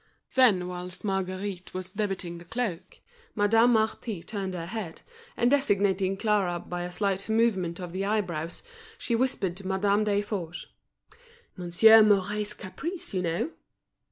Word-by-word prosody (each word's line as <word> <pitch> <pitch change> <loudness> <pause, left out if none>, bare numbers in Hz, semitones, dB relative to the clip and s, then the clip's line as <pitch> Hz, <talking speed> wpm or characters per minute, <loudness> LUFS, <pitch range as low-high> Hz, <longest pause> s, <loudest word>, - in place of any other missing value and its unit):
Then 215 -9 +4
whilst 180 +2 -3
Marguerite 190 -1 -3
was 185 0 -1
debiting 195 -4 -2
the 170 - -12
cloak, 190 -5 -4 0.4
Madame 225 +3 +4
Marty 220 -4 -1
turned 195 -4 -4
her 165 -2 -4
head, 185 -3 -6 0.3
and 240 +1 +3
designating 200 -8 +2
Clara 200 -5 +1
by 175 +1 -5
a 175 0 -4
slight 195 +1 -1
movement 200 -7 +1
of 180 -2 -6
the 190 +2 -3
eyebrows, 175 -6 -2 0.3
she 250 - -3
whispered 230 -7 0
to 190 -1 -7
Madame 200 +2 +2
Desforges: 200 -4 -2 0.9
"Monsieur 195 +5 +6
Mouret's 210 0 +2
caprice, 325 - -6
you 185 - 0
know!" 170 - -1
195 Hz, 135 wpm, -27 LUFS, 180-215 Hz, 0.9 s, Monsieur